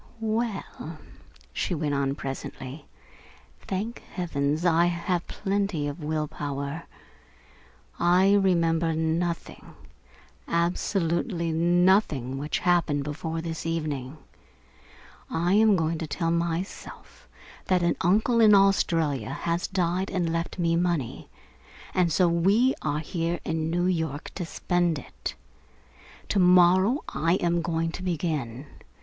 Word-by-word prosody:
"Well," 220 Hz, -7 st, -3 dB, 0.6 s
she 180 Hz, -, -1 dB
went 150 Hz, -2 st, -1 dB
on 140 Hz, -1 st, 0 dB
presently, 135 Hz, +1 st, -7 dB, 0.7 s
"thank 210 Hz, +5 st, -4 dB, 0.2 s
heavens 155 Hz, -2 st, -1 dB
I 170 Hz, 0 st, +4 dB
have 175 Hz, 0 st, -1 dB
plenty 195 Hz, -6 st, -1 dB
of 145 Hz, +3 st, -6 dB
will 155 Hz, 0 st, -1 dB
power. 145 Hz, +1 st, -5 dB, 1.1 s
I 180 Hz, +3 st, +4 dB
remember 170 Hz, -4 st, +2 dB
nothing, 165 Hz, +2 st, -2 dB, 0.7 s
absolutely 170 Hz, +1 st, 0 dB
nothing, 170 Hz, -, +2 dB
which 150 Hz, +2 st, -2 dB
happened 170 Hz, -5 st, +2 dB
before 160 Hz, +3 st, -4 dB
this 165 Hz, -1 st, -5 dB
evening. 150 Hz, -4 st, -3 dB, 1.1 s
I 175 Hz, +3 st, +1 dB
am 215 Hz, 0 st, +5 dB
going 165 Hz, -2 st, 0 dB
to 160 Hz, -, -4 dB
tell 165 Hz, +3 st, -1 dB
myself 170 Hz, +2 st, -4 dB, 0.4 s
that 180 Hz, -2 st, +2 dB
an 170 Hz, -, +2 dB
uncle 220 Hz, +6 st, +3 dB
in 210 Hz, -2 st, +7 dB
Australia 165 Hz, -, +2 dB
has 170 Hz, +5 st, -2 dB
died 185 Hz, 0 st, 0 dB
and 175 Hz, -3 st, -1 dB
left 165 Hz, +2 st, -3 dB
me 165 Hz, -2 st, +1 dB
money, 170 Hz, -7 st, -1 dB, 0.6 s
and 180 Hz, -2 st, +2 dB
so 180 Hz, +3 st, +4 dB
we 195 Hz, +10 st, +3 dB
are 150 Hz, 0 st, -1 dB
here 170 Hz, +1 st, -2 dB
in 160 Hz, 0 st, -1 dB
New 175 Hz, +2 st, 0 dB
York 160 Hz, -5 st, -2 dB
to 180 Hz, -, -4 dB
spend 175 Hz, -1 st, 0 dB
it. 140 Hz, -, -7 dB, 0.9 s
To 200 Hz, -, +2 dB
morrow 185 Hz, -, +5 dB
I 165 Hz, +4 st, +1 dB
am 175 Hz, -2 st, +1 dB
going 165 Hz, -1 st, -1 dB
to 180 Hz, -, -7 dB
begin. 150 Hz, -8 st, -2 dB
170 Hz, 120 wpm, -26 LUFS, 155-180 Hz, 1.1 s, in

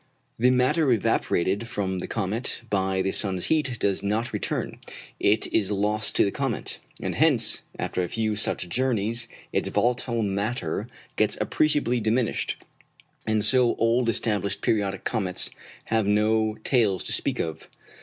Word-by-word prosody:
The 125 Hz, +2 st, +5 dB
matter 130 Hz, +4 st, +3 dB
evaporated 100 Hz, -1 st, +1 dB
from 95 Hz, -4 st, -2 dB
the -, -, -5 dB
comet 115 Hz, +4 st, -2 dB
by 95 Hz, -1 st, +1 dB
the 95 Hz, -, 0 dB
sun's 95 Hz, -3 st, 0 dB
heat 145 Hz, -6 st, 0 dB
does 100 Hz, -2 st, +1 dB
not 105 Hz, +4 st, -1 dB
return -, -, -2 dB, 0.4 s
it 105 Hz, +2 st, +3 dB
is 100 Hz, -3 st, +2 dB
lost 105 Hz, +1 st, 0 dB
to -, -, +5 dB
the 100 Hz, -, 0 dB
comet; 135 Hz, -2 st, -2 dB, 0.2 s
and -, -, -2 dB
hence, -, -, +2 dB, 0.2 s
after -, -, -2 dB
a 90 Hz, -, -1 dB
few 110 Hz, +2 st, -1 dB
such 100 Hz, -3 st, -2 dB
journeys, 115 Hz, +1 st, 0 dB, 0.3 s
its -, -, 0 dB
volatile 120 Hz, -1 st, 0 dB
matter 100 Hz, -3 st, -2 dB, 0.3 s
gets -, -, +2 dB
appreciably 145 Hz, -5 st, +1 dB
diminished, 115 Hz, +2 st, 0 dB, 0.7 s
and 110 Hz, -1 st, +2 dB
so 120 Hz, +2 st, +4 dB
old 115 Hz, +1 st, +2 dB
established 105 Hz, -3 st, -1 dB
periodic 100 Hz, -3 st, 0 dB
comets 95 Hz, -6 st, -1 dB, 0.3 s
have 110 Hz, -2 st, +1 dB
no 110 Hz, +1 st, +2 dB
tails 110 Hz, -8 st, +2 dB
to -, -, -2 dB
speak -, -, 0 dB
of. 80 Hz, -1 st, -4 dB
110 Hz, 145 wpm, -26 LUFS, 100-120 Hz, 0.7 s, The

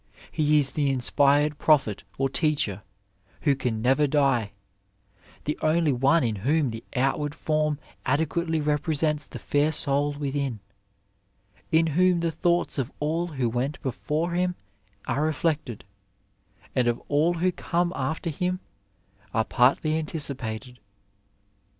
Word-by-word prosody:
He 150 Hz, -1 st, +3 dB
is 140 Hz, -2 st, +2 dB
the 145 Hz, -1 st, 0 dB
inspired 145 Hz, +3 st, +2 dB
prophet 135 Hz, -10 st, +3 dB
or 135 Hz, -, +2 dB
teacher 135 Hz, -, 0 dB, 0.6 s
who 140 Hz, -, +3 dB
can 120 Hz, -4 st, -2 dB
never 135 Hz, +4 st, +3 dB
die, 135 Hz, -7 st, +1 dB, 0.9 s
the 150 Hz, -, -3 dB
only 155 Hz, -1 st, +2 dB
one 135 Hz, +6 st, +3 dB
in 110 Hz, -3 st, -1 dB
whom 140 Hz, +5 st, +1 dB
the 115 Hz, 0 st, -7 dB
out 135 Hz, +3 st, +1 dB
ward 145 Hz, 0 st, -3 dB
form 155 Hz, -1 st, 0 dB, 0.3 s
adequately 160 Hz, +3 st, 0 dB
represents 150 Hz, 0 st, 0 dB
the -, -, -8 dB
fair 145 Hz, +2 st, +1 dB
soul 145 Hz, -1 st, +1 dB
within; 140 Hz, -4 st, -3 dB, 1.1 s
in 165 Hz, 0 st, +4 dB
whom 175 Hz, +2 st, +3 dB
the 165 Hz, -1 st, 0 dB
thoughts 170 Hz, -1 st, 0 dB
of 130 Hz, 0 st, -2 dB
all 160 Hz, +4 st, 0 dB
who 135 Hz, -7 st, -1 dB
went 125 Hz, +5 st, -2 dB
before 150 Hz, +6 st, -2 dB
him 180 Hz, +1 st, 0 dB, 0.5 s
are 130 Hz, +4 st, 0 dB
reflected 155 Hz, -6 st, -1 dB, 0.9 s
and 125 Hz, -1 st, +2 dB
of 120 Hz, 0 st, +2 dB
all 155 Hz, +4 st, +2 dB
who 180 Hz, +2 st, +1 dB
come 175 Hz, 0 st, -1 dB
after 160 Hz, +5 st, -2 dB
him 180 Hz, +4 st, -2 dB, 0.8 s
are 110 Hz, -1 st, +2 dB
partly 135 Hz, +5 st, +2 dB
anticipated. 130 Hz, -6 st, -4 dB
145 Hz, 130 wpm, -26 LUFS, 135-160 Hz, 1.1 s, in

